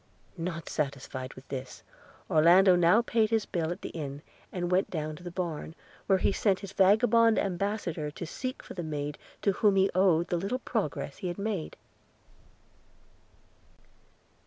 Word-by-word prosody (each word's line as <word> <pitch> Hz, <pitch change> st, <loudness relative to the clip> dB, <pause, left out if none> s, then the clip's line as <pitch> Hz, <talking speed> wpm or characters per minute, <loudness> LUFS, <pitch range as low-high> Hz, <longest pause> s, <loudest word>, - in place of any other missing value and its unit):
Not 165 Hz, -1 st, -4 dB
satisfied 135 Hz, -2 st, -4 dB
with 130 Hz, -, -13 dB
this, 130 Hz, -1 st, -6 dB, 0.4 s
Orlando 180 Hz, +4 st, +6 dB
now 175 Hz, +6 st, +5 dB
paid 225 Hz, -2 st, +2 dB
his 225 Hz, -1 st, +1 dB
bill 165 Hz, -5 st, -2 dB
at 175 Hz, -, -6 dB
the -, -, -4 dB
inn, 145 Hz, -2 st, -6 dB, 0.3 s
and 175 Hz, -1 st, -3 dB
went 185 Hz, +2 st, +2 dB
down 155 Hz, -2 st, -3 dB
to -, -, -14 dB
the 175 Hz, -, -5 dB
barn, 170 Hz, -3 st, -4 dB, 0.3 s
where 195 Hz, -, +4 dB
he -, -, +2 dB
sent 195 Hz, -1 st, +1 dB
his 195 Hz, -1 st, -8 dB
vagabond 220 Hz, +3 st, +5 dB
ambassador 180 Hz, -5 st, -1 dB
to 160 Hz, +4 st, -7 dB
seek 255 Hz, +10 st, -5 dB
for -, -, -9 dB
the 180 Hz, -, -4 dB
maid 150 Hz, -2 st, -4 dB, 0.2 s
to 200 Hz, -, +4 dB
whom 200 Hz, +1 st, +3 dB
he 195 Hz, 0 st, +3 dB
owed 175 Hz, -3 st, +3 dB
the 175 Hz, -, +1 dB
little 195 Hz, +8 st, -2 dB
progress 205 Hz, -, -3 dB
he 185 Hz, -, -4 dB
had 175 Hz, -, -4 dB
made. 200 Hz, -5 st, -3 dB
180 Hz, 160 wpm, -29 LUFS, 155-200 Hz, 0.4 s, Orlando